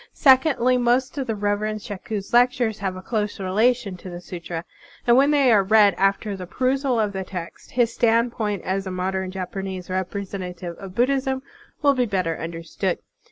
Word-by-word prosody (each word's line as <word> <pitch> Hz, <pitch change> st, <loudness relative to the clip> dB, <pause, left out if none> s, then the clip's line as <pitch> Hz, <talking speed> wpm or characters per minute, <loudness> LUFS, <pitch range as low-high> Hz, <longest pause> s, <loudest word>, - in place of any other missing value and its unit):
Sec 265 Hz, 0 st, +5 dB
ondly, 255 Hz, -3 st, +2 dB
most 245 Hz, +2 st, +1 dB
of 265 Hz, -, -3 dB
the 225 Hz, -, -1 dB
Reverend 210 Hz, +1 st, -1 dB
Shaku's 205 Hz, -1 st, -6 dB
lectures 245 Hz, -3 st, +3 dB
have 190 Hz, -2 st, -2 dB
a 185 Hz, -, -8 dB
close 210 Hz, -2 st, -2 dB
relation 205 Hz, +1 st, +1 dB
to 185 Hz, -, -9 dB
the 175 Hz, -1 st, -7 dB
sutra; 175 Hz, -1 st, -6 dB, 0.4 s
and 235 Hz, -, +5 dB
when 275 Hz, +3 st, +5 dB
they 280 Hz, -4 st, +4 dB
are 210 Hz, -3 st, +6 dB
read 205 Hz, 0 st, +5 dB
after 195 Hz, +3 st, 0 dB
the 185 Hz, -2 st, -7 dB
perusal 255 Hz, +3 st, 0 dB
of 210 Hz, -2 st, 0 dB
the 190 Hz, 0 st, -3 dB
text, 180 Hz, -2 st, -8 dB
his 240 Hz, -2 st, +2 dB
stand 235 Hz, +1 st, +3 dB
point 210 Hz, -5 st, -2 dB
as 190 Hz, +1 st, -2 dB
a -, -, -3 dB
modem 190 Hz, +1 st, -2 dB
Japanese 185 Hz, 0 st, -5 dB
representative 185 Hz, -2 st, -4 dB
of 190 Hz, -1 st, -9 dB
Buddhism 265 Hz, +1 st, +1 dB, 0.4 s
will 285 Hz, -1 st, +6 dB
be 255 Hz, -2 st, +1 dB
better 185 Hz, -5 st, 0 dB
understood. 165 Hz, 0 st, -3 dB
205 Hz, 180 wpm, -23 LUFS, 185-245 Hz, 0.4 s, are